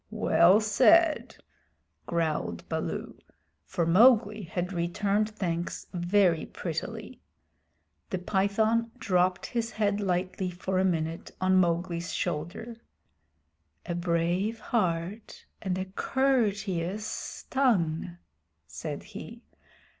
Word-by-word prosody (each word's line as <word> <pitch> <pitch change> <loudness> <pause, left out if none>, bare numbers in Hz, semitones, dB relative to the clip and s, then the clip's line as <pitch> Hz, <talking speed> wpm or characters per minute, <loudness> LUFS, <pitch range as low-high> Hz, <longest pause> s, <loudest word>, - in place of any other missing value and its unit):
"Well 200 -3 +4
said," 300 +10 +4 0.7
growled 155 - -2
Baloo, - - -4 0.5
for 170 - -1
Mowgli 215 +3 +5
had 180 0 -4
returned 200 +5 0
thanks 175 -5 -3
very 175 -1 +2
prettily. - - -5 0.9
The - - -1
Python 215 +5 +1
dropped 185 -4 +1
his 230 -2 -2
head 205 -3 0
lightly 185 0 -1
for 185 +1 -2
a - - +3
minute 165 -3 -1
on 185 0 +3
Mowgli's 170 -1 0
shoulder. 180 +10 -4 1.1
"A - - -3
brave 175 +5 0
heart 195 -1 -2 0.2
and 185 -3 -1
a 185 - -2
courteous 205 -4 -1
tongue," 180 - +1 0.5
said - - -6
he. - - -10
185 Hz, 95 wpm, -28 LUFS, 170-215 Hz, 1.1 s, Mowgli